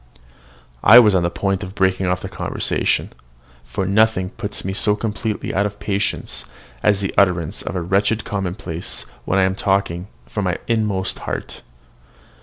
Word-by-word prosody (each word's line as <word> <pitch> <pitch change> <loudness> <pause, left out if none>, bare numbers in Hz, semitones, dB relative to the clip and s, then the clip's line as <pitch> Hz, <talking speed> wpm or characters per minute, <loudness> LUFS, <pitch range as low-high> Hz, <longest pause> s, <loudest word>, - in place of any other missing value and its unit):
I 115 - +9
was 110 -4 +8
on 95 - +3
the 85 - +1
point 95 +2 -1
of 95 +1 -8
breaking 95 -1 +1
off 90 0 0
the - - -3
conversation, - - -1 0.5
for 95 - -3
nothing 100 -1 +2
puts 100 -2 -4
me 95 - -2
so 105 +1 +2
completely 110 0 -3
out 100 +2 +2
of 105 0 -10
patience 100 - -2 0.4
as 100 -1 +3
the 95 - -2
utterance 90 -2 +2
of - - -5
a 90 - -1
wretched 100 +4 +1
commonplace 90 -4 -3 0.2
when 95 - +1
I 95 - +4
am 95 0 +2
talking 95 -4 0 0.2
from 105 -4 -3
my 90 -1 0
inmost 105 -5 0
heart. - - -5
95 Hz, 165 wpm, -20 LUFS, 90-105 Hz, 0.5 s, I